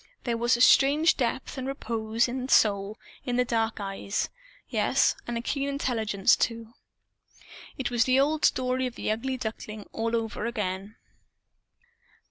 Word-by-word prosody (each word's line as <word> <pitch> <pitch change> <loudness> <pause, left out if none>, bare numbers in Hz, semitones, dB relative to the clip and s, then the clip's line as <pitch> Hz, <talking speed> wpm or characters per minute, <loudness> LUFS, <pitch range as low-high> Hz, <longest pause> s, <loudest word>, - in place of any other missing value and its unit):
There 240 -2 -1
was 235 +1 +2
a - - -2
strange 285 +5 +5
depth 260 +1 -2
and 260 - -4
repose 230 -3 -1
and 255 +1 -4
Soul 205 -2 +3 0.3
in 245 - -2
the 250 0 +2
dark 225 -2 -1
eyes 200 0 -3 0.4
yes, - - +2
and 240 0 -2
a - - -2
keen 280 +2 -1
intelligence, 225 -8 +1
too. 230 -1 -2 1.0
It 255 -2 -2
was 235 -2 +3
the 260 +1 +3
old 300 +2 +1
story 255 0 +2
of 250 - -8
the - - -2
Ugly 260 +4 -2
Duckling, 220 -2 -6
all 230 +1 -1
over 225 0 -2
again. 205 -2 -4
235 Hz, 150 wpm, -27 LUFS, 220-260 Hz, 1.0 s, strange